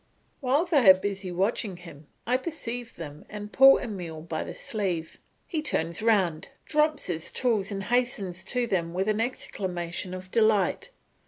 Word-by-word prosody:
While 280 +5 +2
they 285 - +5
are 190 - +11
busy 195 -1 -4
watching 195 +1 -1
him, 160 -4 -13 0.2
I 245 - +2
perceive 245 -5 -4
them 150 -3 -8
and 210 0 -7
pull 270 +1 +8
Emile 175 -9 -6
by 160 -1 -3
the - - -7
sleeve; 180 -7 -3 0.3
he 320 -3 -2
turns 170 - -1
round, 195 -8 +2 0.2
drops 305 -1 +2
his 165 -2 -1
tools, 220 -6 0
and 195 -1 -3
hastens 205 -6 0
to 245 +4 0
them 175 -6 -1
with 190 +2 0
an 215 +1 +1
exclamation 185 -6 -3
of 185 0 -9
delight. 220 - +2
200 Hz, 160 wpm, -27 LUFS, 175-245 Hz, 0.3 s, are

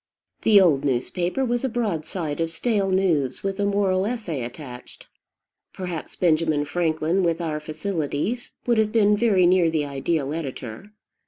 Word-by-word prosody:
The 210 -2 +6
old 155 -7 +4
newspaper 175 - -1
was 240 0 -1
a 265 - +1
broadside 170 -8 -2
of 165 - 0
stale 195 +4 0
news, 170 -9 +1
with 195 0 -2
a 200 - +2
moral 200 -1 +1
essay 210 - -3
attached. 125 0 -10 0.7
Perhaps 180 -4 -6
Benjamin 155 -3 +2
Franklin, 160 +3 0
with 170 -2 +1
our 160 -3 -2
facilities, 160 - -3
would 235 -2 +2
have 215 -1 +2
been 210 -2 +4
very 205 -5 +3
near 175 -1 +4
the 155 -2 0
ideal 140 +1 -1
editor. 135 - -6
170 Hz, 150 wpm, -24 LUFS, 150-200 Hz, 0.7 s, The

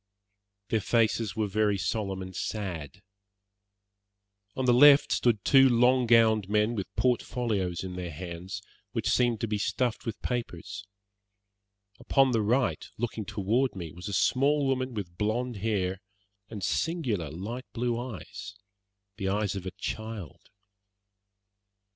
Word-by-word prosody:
Their 110 - +1
faces 110 0 +1
were 110 - 0
very 105 0 +1
solemn 95 -1 -2
and 95 0 -9
sad. 95 -4 -4 1.5
On 130 - -1
the 125 - +5
left 145 +3 +7
stood 110 -6 +1
two 135 -1 +7
long 125 +1 +4
gowned 110 -4 +4
men 105 +2 +2
with 100 -5 -3
port 125 -1 +2
folios 100 -9 -2
in 90 -1 -6
their 90 -1 -4
hands, 85 +3 -7 0.3
which - - -1
seemed 120 -3 +2
to 115 - 0
be 105 -1 -1
stuffed 120 +2 -1
with 110 - -4
papers. 105 -3 -4 1.1
Upon 135 -2 +3
the 115 -2 +2
right, 120 +5 +1
looking 110 -2 -3
toward 110 +7 0
me, 85 -4 -6
was 90 +5 -9
a 100 - -4
small 140 +7 +2
woman 130 -2 -1
with 90 -5 -6
blonde 115 +3 -1
hair 95 -3 -1 0.5
and 105 -4 -7
singular, 120 - -1
light 110 - -6
blue 120 0 -1
eyes 120 -4 -7 0.6
the 95 -2 -1
eyes 100 -1 0
of 95 -1 -5
a - - -3
child. 110 -7 -6
110 Hz, 140 wpm, -28 LUFS, 95-120 Hz, 1.5 s, left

